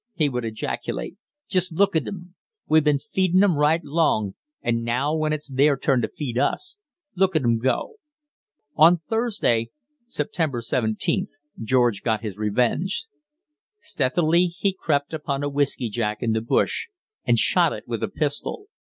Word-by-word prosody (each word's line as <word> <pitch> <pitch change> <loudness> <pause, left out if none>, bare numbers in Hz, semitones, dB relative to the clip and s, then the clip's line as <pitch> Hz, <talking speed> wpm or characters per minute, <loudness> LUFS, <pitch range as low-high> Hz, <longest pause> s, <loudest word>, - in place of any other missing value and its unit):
he 155 -4 +2
would 125 -2 -3
ejaculate. 110 +9 -4 0.3
"Just 185 -2 +1
look 200 +2 +2
at 160 - +1
'em! 180 -2 -8 0.3
We've 155 0 +4
been 150 -1 +3
feedin' 185 +2 +2
'em 190 -5 +3
right 150 +3 +2
long, 140 - +1 0.3
and 115 -1 0
now 125 +6 0
when 155 -1 0
it's 155 -1 -3
their 140 +1 +3
turn 130 -1 +1
to - - 0
feed 125 -5 -4
us, 370 - -1 0.4
look 190 -1 +2
at 155 - +2
'em 115 -1 +2
go!" 130 - -1 0.8
On 170 +3 +6
Thursday 195 - 0 0.4
(September 150 - -2
17th) 130 - -1 0.3
George 120 -2 +2
got 110 -3 0
his 105 -4 -4
revenge. 125 - 0 0.7
Stealthily 170 - +1
he 200 -1 +1
crept 145 -5 -1
upon 145 -3 -3
a 145 - 0
whiskey 140 -3 0
jack 105 -1 -2
in 115 - +1
the 110 0 0
bush 115 - 0 0.4
and - - +2
shot - - +4
it - - -6
with - - -4
a - - 0
pistol. 410 -1 -3
145 Hz, 160 wpm, -23 LUFS, 120-175 Hz, 0.8 s, On